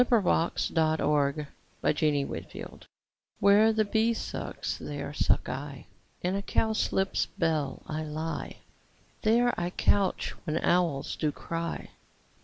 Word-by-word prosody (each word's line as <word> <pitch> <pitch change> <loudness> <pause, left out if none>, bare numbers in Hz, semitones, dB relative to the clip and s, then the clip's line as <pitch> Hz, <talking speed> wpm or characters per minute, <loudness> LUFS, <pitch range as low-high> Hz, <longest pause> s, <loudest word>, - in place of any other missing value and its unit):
Fairy 245 -1 +4
Land 170 -1 +1
iv 150 -2 +2 1.9
WHERE 205 +2 +6
the 220 -1 +2
bee 220 +3 +2
sucks, - - -4
there 145 0 -5
suck - - +2
I: 135 +1 -5 0.4
In 180 +1 +1
a 200 - -1
cowslip's 205 -2 +1
bell 155 -5 0
I 155 0 -3
lie; 155 +2 -4 0.7
There 240 +2 +4
I 175 0 -1
couch 195 +1 +1
when 155 -1 0
owls 170 -7 +1
do 155 -2 0
cry. 165 +3 -4
165 Hz, 110 wpm, -29 LUFS, 150-205 Hz, 1.9 s, WHERE